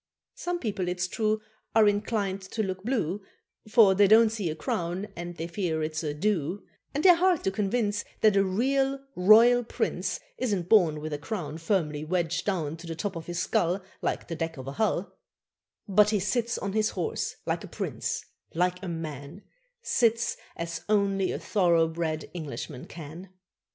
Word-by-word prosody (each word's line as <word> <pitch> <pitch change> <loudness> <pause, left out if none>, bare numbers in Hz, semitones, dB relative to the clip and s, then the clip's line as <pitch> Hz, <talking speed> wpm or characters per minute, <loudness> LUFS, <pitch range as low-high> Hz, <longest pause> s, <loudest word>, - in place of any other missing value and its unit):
Some 355 0 -3
people, 205 - -2
it's 180 +1 -1
true, 215 +2 0 0.3
Are 220 -1 +6
inclined 205 -1 0
to 220 - 0
look 185 -1 -4
blue, 210 - -1 0.5
For 215 -4 +6
they 200 +1 +5
don't 220 +2 +6
see 210 -6 -2
a 155 - -3
crown, 175 +5 -2
and 175 0 -6
they 165 - -3
fear 170 -3 -2
it's 155 0 -2
a 155 -3 -2
"do;" 180 +1 -1 0.3
And 290 +3 -2
they're 365 - +9
hard 360 -2 +3
to 195 - +1
convince 205 +1 0 0.2
That 215 -2 +5
a 195 - +5
real 270 +8 +1 0.2
royal 230 +6 +7
prince 235 - -2 0.2
Isn't 200 -8 -1
born 165 -9 +4
with 155 0 -4
a 145 - -3
crown 165 -2 -5
Firmly 160 -4 0
wedged 175 +2 -1
down 165 -6 -1
To 170 +1 -10
the 165 - -4
top 195 +3 -3
of 165 -1 -7
his 175 0 -4
skull, 180 +2 +1 0.2
Like - - -2
the 165 - -4
deck 165 -1 -3
of 130 - -7
a - - -3
hull; 200 +2 -1 0.7
But 210 +1 +5
he 210 -1 +2
sits 235 +5 0
on 195 -1 -3
his 215 0 +2
horse - - -3
like - - -1
a - - -7
prince, - - -3 0.3
like 180 +1 +1
a 190 - -5
man, 160 +1 -6 0.4
Sits 230 -1 +2 0.2
as 170 0 -4
only 195 -2 +2
a - - -2
thoroughbred 165 -4 +1
Englishman 155 -6 -6
can. 165 +3 -9
190 Hz, 175 wpm, -28 LUFS, 165-215 Hz, 0.7 s, they're